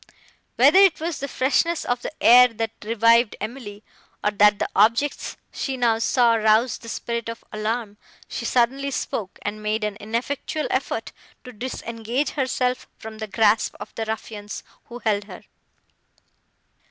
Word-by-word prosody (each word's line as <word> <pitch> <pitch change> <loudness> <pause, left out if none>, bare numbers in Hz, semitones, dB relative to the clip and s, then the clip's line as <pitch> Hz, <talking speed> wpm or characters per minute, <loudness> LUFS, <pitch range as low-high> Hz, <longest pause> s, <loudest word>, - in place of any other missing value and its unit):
Whether 380 - +6
it 390 -5 +5
was 330 0 -3
the 280 - -3
freshness 290 +6 +1
of 245 0 -1
the - - -4
air, 250 +2 +9
that 225 -2 -4
revived 230 +1 +3
Emily, 215 -2 -7 0.4
or 210 - +2
that 210 0 +4
the - - -1
objects 230 +8 +2
she 270 -2 -3
now 230 -3 +2
saw 235 0 +3
roused 220 +2 +2
the 230 - -9
spirit 235 0 -4
of 230 - -7
alarm, 215 0 -3 0.3
she - - -5
suddenly 265 +3 +1
spoke, 210 -7 -4
and 210 +1 -4
made 215 +1 -1
an 210 -1 -2
ineffectual 250 +7 -3
effort - - -2 0.3
to 250 - -10
disengage 235 +2 -3
herself 255 -2 -1
from 220 0 -10
the 220 - -4
grasp 210 +2 +2
of - - -9
the 225 - -3
ruffians, 215 -1 -6 0.2
who 240 - -9
held 205 -2 +1
her. - - -11
230 Hz, 155 wpm, -23 LUFS, 215-250 Hz, 0.4 s, air